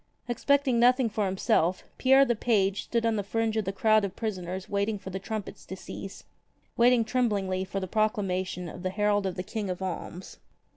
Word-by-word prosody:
Expecting 265 0 +2
nothing 250 0 +4
for 210 0 0
himself, 185 -1 +1 0.2
Pierre 270 +1 +6
the 240 -2 +1
page 200 -4 +1
stood 235 -1 0
on 225 -1 +1
the 205 - -1
fringe 225 +2 -1
of 220 -2 0
the 195 - -1
crowd 215 +2 +3
of 200 -1 -3
prisoners 190 -4 -4
waiting 200 +1 -1
for 190 -1 -8
the 190 - -4
trumpets 215 +1 -6
to 190 - -6
cease, 195 +1 -9 0.5
waiting 240 -1 +4
tremblingly 200 -7 0
for 195 +1 -4
the 190 - -3
proclamation 190 -4 -1
of 165 - -8
the 185 - -1
herald 205 0 +1
of 185 - -3
the 185 - -4
King 205 0 -4
of 180 - -3
Alms. 185 -1 -6
205 Hz, 195 wpm, -28 LUFS, 190-225 Hz, 0.5 s, Pierre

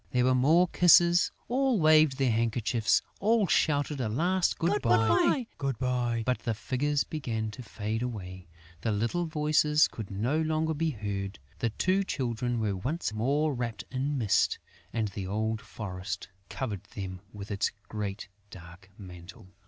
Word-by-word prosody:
There 125 -2 +2
were 130 - +4
more 155 +8 +4
kisses; 175 0 +5 0.2
all 260 -2 +1
waved 155 -3 +5
their 135 -3 +2
handkerchiefs; 115 0 +1 0.2
all 220 0 +3
shouted 145 -4 +1
a 115 - -1
last 175 +10 +1
good 180 +5 +1
bye. 115 - +3 0.8
But 125 -1 0
the 115 - -2
figures 135 +7 0
began 115 -8 -3
to 105 - -9
fade 110 -1 -4
away; 95 -7 -6 0.3
the 110 - 0
little 115 +12 -1
voices 150 -1 +3
could 110 -4 -8
no 120 +11 0
longer 160 0 0
be 160 +2 0
heard; 100 -5 -4 0.2
the 115 - 0
two 185 - +1
Children 120 -6 -2
were 105 -3 0
once 135 - -2
more 140 +7 +1
wrapped 120 -3 -4
in 135 +2 -1
mist; 105 -6 +2 0.3
and 110 -3 -1
the 95 -1 -6
old 110 +2 -1
forest 95 -2 -6 0.2
covered 105 -8 -4
them 95 -2 -5
with 105 0 -8
its 100 0 0 0.2
great 105 -2 -5 0.2
dark 90 +1 -13
mantle. 90 -1 -12
120 Hz, 150 wpm, -29 LUFS, 105-155 Hz, 0.8 s, kisses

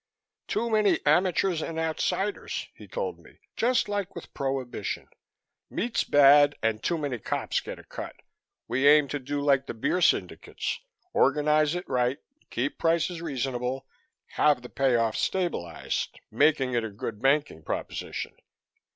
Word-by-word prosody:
"Too 230 +2 0
many 215 -5 +3
amateurs 175 +2 +3
and 160 - -4
outsiders," 160 +5 -2
he - - -13
told 480 -3 -4
me, - - -18 0.2
"just 245 +2 +2
like 205 -2 -3
with 170 - -9
Prohibition. 135 -2 -3 0.6
Meat's 235 +1 -1
bad 145 0 +6
and 110 -1 +1
too 170 - 0
many 140 -6 -3
cops - - -1
get - - -7
a - - -13
cut. - - -7 0.5
We 130 +4 +2
aim 150 0 +7
to 145 - -2
do 145 +2 -3
like 140 -2 +2
the - - -5
beer 180 +10 0
syndicates - - 0 0.3
organize 150 +2 +3
it 180 - -4
right, 125 +1 +1 0.3
keep 130 +4 -2
prices 165 +1 +1
reasonable, 130 -4 -2 0.4
have 145 -4 +2
the 125 - -8
pay 135 -2 +2
off 115 -2 +1
stabilized, 170 - -2
make 155 -1 +4
it 125 -3 0
a 110 - -3
good 105 +1 -6
banking 140 - +2
proposition. - - -4
145 Hz, 145 wpm, -27 LUFS, 125-170 Hz, 0.6 s, aim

